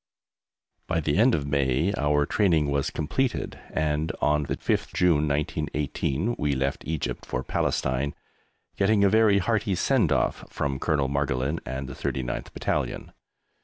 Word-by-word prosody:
By 80 - 0
the 75 -2 0
end 120 +3 +5
of 70 - -2
May 70 +5 +1
our 75 -4 +2
training 80 -8 +2
was 70 -1 0
completed 120 - -2
and 80 +1 0
on 75 0 +2
the - - -3
5th - - -1
June, 80 -4 +3
1918, 75 - -1
we 75 -1 +1
left 70 +1 -1
Egypt 80 -2 -3
for 60 - -3
Palestine, 65 +3 -1 0.6
getting 100 +1 +3
a 100 - +5
very 110 -1 +5
hearty 105 0 +1
"send - - +2
off" - - +1
from 70 -2 -2
Col. 75 -4 +1
Margolin 70 +2 -1
and 65 +1 -4
the - - -7
39th 60 -2 -3
Battalion. - - -2
75 Hz, 145 wpm, -26 LUFS, 70-90 Hz, 0.6 s, end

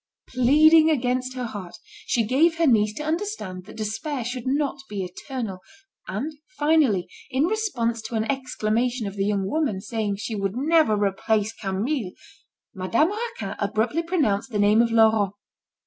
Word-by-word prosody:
Pleading 310 +6 +5
against 255 -2 0
her 250 -1 -3
heart, 200 -6 -7 0.3
she 230 -2 +1
gave 315 +8 +3
her 335 - +3
niece 215 -6 +4
to 300 - -5
understand 310 - -3
that 215 - -12
despair 225 +6 -3
should 250 +1 -4
not 280 +1 0
be 200 -2 -3
eternal; 195 +2 -6 0.5
and, 260 +12 -3 0.2
finally, 295 - +3 0.2
in 265 +1 +1
response 300 - -1
to 230 - -6
an 220 - +1
exclamation 245 -2 -1
of 200 0 -5
the 195 0 0
young 200 -2 0
woman 285 -7 0
saying 210 0 -2
she 215 +3 -5
would 195 -1 -2
never 305 -4 +3
replace 210 +2 0
Camille, 205 +2 -2 0.6
Madame 230 - +1
Raquin 420 - -4
abruptly 220 +9 0
pronounced 285 - 0
the 215 - -3
name 205 +2 +5
of 235 - +2
Laurent. 220 -3 +4
230 Hz, 155 wpm, -24 LUFS, 205-295 Hz, 0.6 s, Pleading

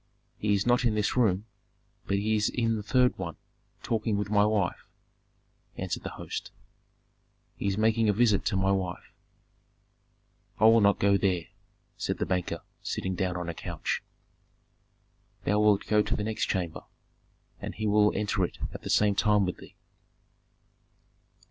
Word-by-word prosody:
"He 105 -1 +2
is 100 0 0
not 120 +2 +3
in 115 -3 +2
this 105 -1 0
room, 105 -5 +2 0.6
but 100 - +1
he 110 +2 +1
is 105 0 +2
in 115 -2 0
the 105 - -3
third 125 +4 +2
one 85 -4 -4 0.5
talking 110 -2 0
with 105 0 -3
my 105 -1 +5
wife," 105 -4 0 0.9
answered - - -3
the - - -5
host. - - -5 1.1
"He - - -3
is 100 0 0
making 110 0 +3
a - - +6
visit 110 -1 +3
to - - 0
my 95 +1 +2
wife." 95 -3 -3 1.5
"I - - 0
will 115 +1 +7
not 100 0 +4
go 100 0 +3
there!" 90 -4 +1 0.5
said - - -2
the - - -1
banker, 90 -1 -2 0.2
sitting 95 - -3
down 90 0 -1
on 90 -1 -4
a 85 - -3
couch. - - -3 1.4
"Thou 105 +1 +2
wilt 105 -1 +3
go 105 -1 +3
to 105 +3 -1
the 105 - -2
next 110 0 -1
chamber, 90 -5 -2 0.8
and - - -6
he 110 - -3
will 105 0 +4
enter 105 -1 0
it 90 - -3 0.2
at - - -8
the - - -7
same 105 -1 +4
time 105 0 +3
with 90 - -3
thee." - - -14
105 Hz, 165 wpm, -28 LUFS, 95-110 Hz, 1.5 s, will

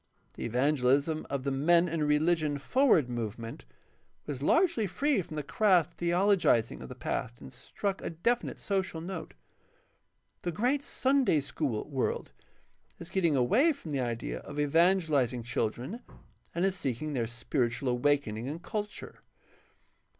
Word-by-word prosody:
The - - -6
evangelism 140 +5 +1
of 140 -2 -2
the 140 - -1
Men 170 +6 +4
and 160 -3 -1
Religion 150 0 +2
Forward 200 - +3
Movement 115 - -5 0.6
was 140 -3 -5
largely 320 - +3
free 275 - +1
from 160 - -9
the 150 - -3
crass 180 0 +3
theologizing 175 - +2
of - - -8
the 125 - -8
past 120 -1 -3
and 130 - -11
struck 195 +10 -4
a - - -3
definite 230 +9 -1
social 190 -4 -2
note. 170 0 -6 1.1
The 175 - -2
great 250 - +1
Sunday 265 - +2
school 140 -5 -3
world 135 - -2 0.7
is 170 +2 -9
getting 170 -6 +2
away 225 - +4
from 175 - -9
the 140 - -1
idea 120 -2 -3
of 145 0 -8
evangelizing 150 -6 +2
children 120 - -3 0.5
and 175 +2 +1
is 195 -1 +1
seeking 145 -2 -3
their 120 -4 -1
spiritual 120 +2 -2
awaken 125 -2 +1
ing 120 +4 -4
and 155 +3 -5
culture. 210 +3 -5
150 Hz, 145 wpm, -30 LUFS, 125-190 Hz, 1.1 s, Men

